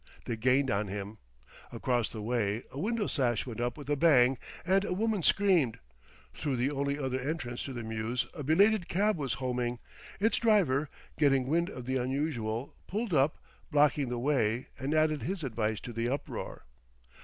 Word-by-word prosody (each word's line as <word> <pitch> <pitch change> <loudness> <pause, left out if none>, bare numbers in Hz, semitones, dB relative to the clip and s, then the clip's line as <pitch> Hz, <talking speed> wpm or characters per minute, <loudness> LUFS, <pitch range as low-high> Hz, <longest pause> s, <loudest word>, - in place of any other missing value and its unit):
They 115 - -2
gained 130 +3 +2
on 100 +1 0
him. 100 +2 -6 0.5
Across 120 -3 0
the 110 -2 -7
way 110 -2 0
a 135 - -6
window 220 +4 0
sash 120 - +1
went 120 -2 -5
up 120 0 -1
with 145 -2 -9
a 145 - +2
bang, 135 -5 +5 0.3
and 190 +2 +3
a 180 - -1
woman 215 0 0
screamed. 175 - +3 0.6
Through 145 -4 -2
the 125 +3 +1
only 140 0 -1
other 130 -2 -2
entrance 130 -3 -3
to 135 - -5
the 120 -2 -5
mews 110 +3 -2
a 160 - -7
belated 185 +6 +4
cab 210 +4 +2
was 135 -7 -2
homing; 125 -2 -2 0.4
its 220 +3 +2
driver, 170 - +3 0.3
getting 135 -3 +4
wind 170 +6 +1
of 125 - -8
the 130 +1 0
unusual, 125 -3 -2
pulled 210 0 -2
up, 140 +1 +3 0.3
blocking 145 -3 +3
the 120 - -2
way, 120 -3 0
and 140 +3 -1
added 155 -2 +2
his 175 - -3
advice 110 -4 -1
to 120 - -7
the 115 +1 -1
uproar. 140 - -5
135 Hz, 180 wpm, -30 LUFS, 120-155 Hz, 0.6 s, bang